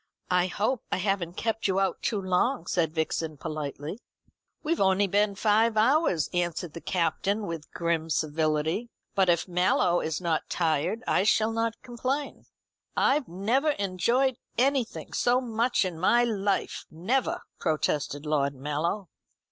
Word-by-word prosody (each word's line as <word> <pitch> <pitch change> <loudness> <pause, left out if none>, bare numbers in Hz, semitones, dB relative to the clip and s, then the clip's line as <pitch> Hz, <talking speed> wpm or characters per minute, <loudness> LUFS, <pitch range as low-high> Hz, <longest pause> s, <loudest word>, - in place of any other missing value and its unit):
"I 180 0 +3
hope 215 +6 -1
I - - +1
haven't 190 -3 -1
kept 225 -1 -1
you 190 0 +1
out 195 - 0
too 210 - 0
long?" 190 +8 +1
said 165 -4 0
Vixen 160 -1 -1
politely. 150 +5 -5 0.6
"We've 330 +2 0
only 190 +1 +4
been 200 +1 +1
five 220 +2 +3
hours," 235 - +3
answered 175 -2 -1
the 170 - -8
Captain 200 +4 0
with 165 -4 -6
grim 170 -1 -1
civility; 155 +7 0 0.2
"but 190 -2 +3
if 170 +1 +2
Mallow 180 -1 +2
is 160 -1 -2
not 170 -3 -1
tired, 165 +7 0
I - - +2
shall 220 +2 +3
not 225 0 -1
complain." 260 +3 -3 0.5
"I 290 +2 +3
never 235 - +1
enjoyed 235 +6 +1 0.2
anything 265 -2 0
so 245 +1 +3
much 235 -2 +1
in 175 -3 -4
my 235 +7 +4
life, 205 -4 -1
never," 220 +12 -1 0.2
protested 150 -2 -1
Lord 140 -2 +1
Mallow. 150 +8 -2
190 Hz, 140 wpm, -27 LUFS, 165-230 Hz, 0.6 s, only